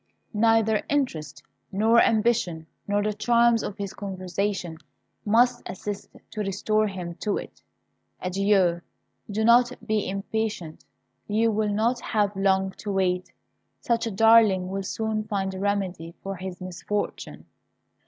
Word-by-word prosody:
Neither 220 0 +3
interest, 250 - -2 0.3
nor 220 +4 +4
ambition, 215 -8 +1 0.2
nor 205 0 +1
the 210 0 0
charms 235 +1 +3
of 205 - -5
his 200 -2 -5
conversation, 185 -3 -3 0.5
must 240 +3 +3
assist 200 +1 -6 0.2
to - - -7
restore 215 +2 +1
him 180 -3 -5
to 210 -2 0
it. - - -9 0.6
Adieu! 185 -2 +2 0.5
Do 215 +2 0
not 240 +1 +6
be 215 -3 0
impatient; 195 -4 -3 0.4
you 225 +2 +2
will 215 0 0
not 230 +4 +1
have 210 -2 0
long 190 0 +2
to 205 - -4
wait. 180 -2 0 0.5
Such 230 -1 0
a - - -2
darling 210 -3 +5
will 195 +1 -3
soon 215 +2 -2
find 195 -3 -2
a 190 - -6
remedy 190 -4 -2
for 195 0 -4
his 185 0 -7
misfortune." 185 +3 -4
205 Hz, 135 wpm, -25 LUFS, 190-220 Hz, 0.6 s, not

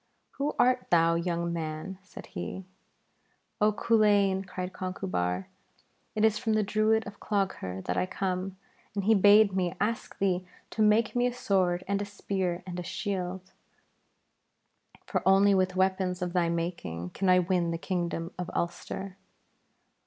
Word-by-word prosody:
'Who 285 +2 -1
art 250 0 +3
thou, 165 -1 +4
young 170 0 -1
man?' 160 +3 -5
said 195 - -11
he. 190 - -5 1.0
'Oh 210 +1 +5
Culain!' 205 -3 +3
cried 185 0 -5
Conchubar, 95 - -2 0.7
'it 215 0 +3
is 215 -1 +2
from 225 -3 0
the 215 0 +2
Druid 215 +2 +2
of 205 0 -9
Clogher 185 - -2
that 90 - -1
I 90 0 +1
come, 190 0 -3 0.4
and 200 - -1
he 220 +3 +5
bade 205 0 +6
me 180 -3 0
ask 220 +3 -2
thee 185 -2 +1 0.3
to 220 - -2
make 215 +2 +3
me 245 0 +3
a - - -1
sword 185 -7 +1
and 200 0 0
a - - -2
spear 190 -3 -3
and 180 -1 -5
a - - -4
shield, 185 0 -4 1.5
for - - -1
only 195 +1 +5
with 185 -1 +1
weapons 185 -1 +1
of 175 -1 -3
thy 175 -2 +2
making 165 - -3
can 190 -1 0
I 180 - +7
win 180 -1 +1
the 165 - -1
Kingdom 170 -1 -3
of 180 - -3
Ulster.' 185 +2 -4
190 Hz, 155 wpm, -29 LUFS, 175-205 Hz, 1.5 s, I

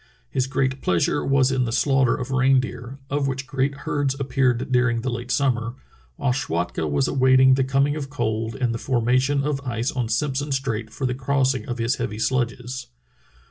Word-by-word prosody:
His 130 0 0
great 130 0 -1
pleasure 90 +11 +1
was 135 -1 +3
in 130 -2 +1
the 115 - -3
slaughter 135 0 +2
of 125 +1 -5
reindeer, 130 -1 +1
of 140 -1 0
which 135 0 -3
great 140 0 -1
herds 140 -2 -1
appeared 130 -2 0
during 125 -2 +2
the 130 +1 -2
late 120 +1 -5
summer, 120 -2 0 0.4
while 125 - 0
Schwatka 85 - -2
was 70 -2 +1
awaiting 130 0 +5
the 135 0 +2
coming 135 +2 +1
of 140 -3 -5
cold 110 -5 -2
and 125 -3 0
the 115 - -4
formation 130 +3 +1
of 145 -1 -1
ice 120 -2 -2
on 125 -4 -2
Simpson 140 +5 -1
Strait 120 -5 -2
for 135 +5 -4
the 125 - 0
crossing 130 -2 0
of 120 - -3
his 115 +1 0
heavy 105 - -3
sledges. 125 +1 -2
130 Hz, 180 wpm, -23 LUFS, 120-135 Hz, 0.4 s, awaiting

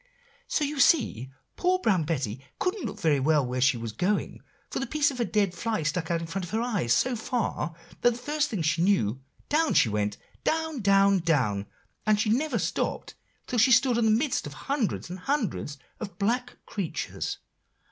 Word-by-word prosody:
"So 305 - 0
you 290 0 -2
see 235 - +3 0.3
poor 365 +1 +2
Brown 195 - +1
Betty 135 -6 -2
couldn't 365 +1 -1
look - - -7
very 150 -4 +2
well 150 0 +3
where 125 +1 -2
she 125 -1 +4
was 115 -1 -5
going; 180 - -1 0.3
for - - -2
the 270 - -3
piece 300 -2 +2
of 255 - -8
a 240 - +2
dead 205 -5 +1
fly 225 -5 -2
stuck 160 +2 -1
out 170 -1 0
in - - -4
front 185 +4 -4
of 175 - -6
her 220 +1 -1
eyes 205 - -1
so 250 - +3
far, 220 -9 -2 0.3
that 240 - +6
the - - -7
first 295 +4 -1
thing 205 - -2
she 165 +2 +1
knew, 135 - +2 0.3
down 315 +1 +2
she 115 - +5
went 105 0 -1 0.3
down, 320 -3 0
down, 195 -1 +4
down, 125 - +1 0.4
and 215 -1 +3
she 215 0 +2
never 295 +7 +1
stopped - - -2 0.3
till 245 - -1
she 250 +4 +5
stood 250 0 +5
in 230 - +2
the - - +4
midst 235 - +1
of 145 - -8
hundreds 270 - -2
and 185 - -6
hundreds 215 - -2 0.2
of 200 -5 -7
black 245 +5 -1
creatures." 195 -7 -4
200 Hz, 200 wpm, -27 LUFS, 150-250 Hz, 0.4 s, that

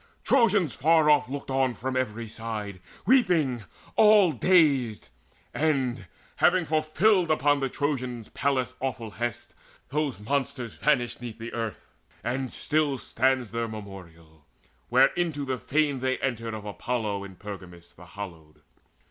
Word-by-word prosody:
Trojans 205 - +3
far 155 +1 +4
off 145 -4 +3
looked 140 0 -5
on 130 -2 +1
from 130 +4 -4
every 115 -3 -2
side 105 -4 -6 0.2
Weeping, 160 - +3 0.3
all 210 -5 +6
dazed. 140 - +2 0.4
And, 130 - 0 0.3
having 180 0 +4
now - - -12
fulfilled 165 +4 +3
Upon 145 -2 +3
the 135 -1 -1
Trojans 125 -5 -3
Pallas' 130 -2 -1
awful 125 -4 -4
hest, 120 +1 -4 0.4
Those 145 -6 -1
monsters 130 +1 -2
vanished 125 -6 0
'neath 115 -2 -7
the 115 +1 -7
earth; 115 -3 -4 0.4
and 130 +2 -2
still 150 -2 0
Stands 130 -1 0
their 115 0 -2
memorial, 85 -7 -11 0.5
where - - +5
into 160 -5 -1
the 130 -2 -2
fane 145 -2 +1
They 130 0 0
entered 115 -4 -3
of 105 -1 -8
Apollo 105 -1 -3
in 95 -1 -11
Pergamus 90 -3 -10
The 90 - -15
hallowed. 85 -6 -10
130 Hz, 140 wpm, -27 LUFS, 110-150 Hz, 0.5 s, all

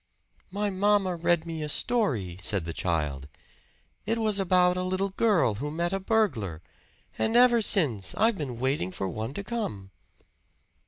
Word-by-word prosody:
"My 205 +2 -2
mamma 195 -1 +2
read 170 0 +1
me 165 -2 -5
a 150 - -4
story," 125 - -1
said 95 -2 0
the 85 - -5
child. 75 -6 -2 0.8
"It 225 +1 0
was 215 -3 +1
about 180 -1 +3
a 180 - -2
little 185 +2 -1
girl 195 - +2
who 145 - -2
met 170 +4 -2
a 195 - 0
burglar. 135 - -1 0.6
And 225 - +1
ever 240 -1 +6
since 135 - +2
I've 225 0 +2
been 130 -8 -5
waiting 130 -7 -1
for 95 - -4
one 110 +8 -5
to 200 - -4
come." 145 - -5
175 Hz, 160 wpm, -27 LUFS, -, 0.8 s, ever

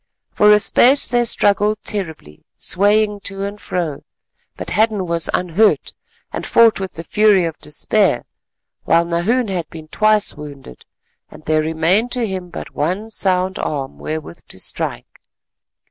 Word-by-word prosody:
For 210 0 +4
a 210 - +7
space 255 +6 +4
they 240 -1 +1
struggled 210 -1 +2
terribly, 160 - -6
swaying 205 +2 +2
to 195 0 -4
and 205 +1 -7
fro, 165 -6 -3 0.5
but - - -7
Hadden 215 -3 +1
was 170 -1 -2
unhurt 180 +5 +1 0.4
and - - -4
fought 230 -3 +4
with 190 -1 -5
the 165 - -7
fury 205 0 +3
of 165 -2 -5
despair, 175 - 0 0.6
while 170 +1 +3
Nahoon 200 +8 0
had 180 -4 -3
been 160 -1 -11
twice 215 +3 +2
wounded, 140 - -11 0.4
and - - -15
there 155 0 +2
remained 165 +9 +1
to 245 -2 -1
him 185 -3 -5
but - - -8
one 185 +9 -2
sound 190 -2 0
arm 135 -3 -4
wherewith 155 - -6
to - - -8
strike. - - -5
190 Hz, 145 wpm, -18 LUFS, 160-210 Hz, 0.6 s, a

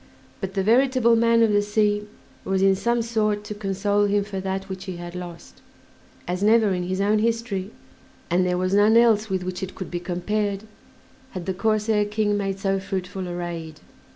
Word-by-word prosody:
But 195 -1 -5
"the 195 - +1
veritable 245 +1 +4
man 230 0 +4
of 220 - +3
the 205 - +4
sea" 210 0 0 0.4
was 190 0 0
in 195 0 +5
some 235 +4 0
sort 215 -2 0
to 210 0 -6
console 205 0 0
him 205 0 +1
for 200 -1 -5
that 190 0 -3
which 190 0 -7
he 185 -2 -5
had 175 0 -8
lost; 175 -2 -9 0.7
as 180 +1 -2
never 215 -1 +4
in 180 -1 -2
his 185 +1 -2
own 210 +2 +2
history 225 -4 -1 0.6
and 180 +2 +2
there 180 0 0
was 185 +1 -1
none 210 +3 +5
else 220 -2 +4
with 190 -1 -1
which 180 0 -5
it 190 0 -5
could 185 - -7
be 175 - -2
compared 195 +3 -2 0.7
had 175 - -6
the 190 - -1
Corsair 215 +1 +1
King 210 0 0
made 195 -1 -2
so 195 0 0
fruitful 190 -1 -4
a 175 - -5
raid. 165 -3 -6
200 Hz, 195 wpm, -24 LUFS, 185-215 Hz, 0.7 s, in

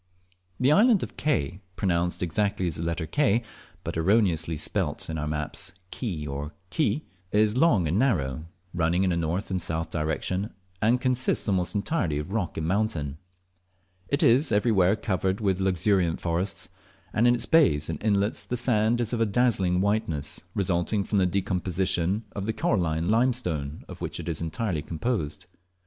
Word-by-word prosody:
The 130 +3 +4
island 215 +3 +5
of - - -7
Ke 90 - -1 0.2
(pronounced 90 -2 0
exactly 100 +2 0
as 85 -4 -1
the - - -4
letter 85 0 -2
K, 120 - +2 0.4
but - - -4
erroneously 85 -3 +2
spelt 80 - -1
in 80 - -3
our 75 - -2
maps 75 +1 -3 0.2
Key 90 - -4
or 70 +2 -5 0.2
Ki) 155 -1 0 0.3
is 105 +1 +3
long 125 - +4
and 85 +7 +1
narrow, 80 - 0 0.3
running 85 +1 +1
in 95 - +2
a - - +1
north 85 +5 -2
and 90 -1 -1
south 80 0 -3
direction, 85 +6 -2 0.3
and 115 +3 +3
consists 125 -1 0
almost 90 -3 0
entirely 100 - 0
of 75 +5 -5
rock 105 -6 -2
and 80 - -2
mountain. 85 -8 -1 0.9
It 140 - 0
is 130 +6 +4
everywhere 105 -3 +3
covered 95 -3 -1
with 95 -4 0
luxuriant 95 -2 +1
forests, 85 +3 -2 0.4
and 115 +3 +3
in 120 - +5
its 120 - 0
bays 80 - +4
and 80 -2 -4
inlets 105 -1 +1
the 125 - -1
sand 115 0 +2
is 115 0 -1
of 115 -3 +1
dazzling 100 -6 +2
whiteness, 95 -8 -1
resulting 95 +2 +1
from 100 +1 0
the 90 - +3
decomposition 90 +1 0
of 100 0 -3
the 110 - 0
coralline 85 -7 0
limestone 110 - 0
of - - -10
which - - -4
it - - -7
is 85 -2 -2
entirely 85 0 -2
composed. 80 +1 -3
95 Hz, 165 wpm, -26 LUFS, 80-110 Hz, 0.9 s, island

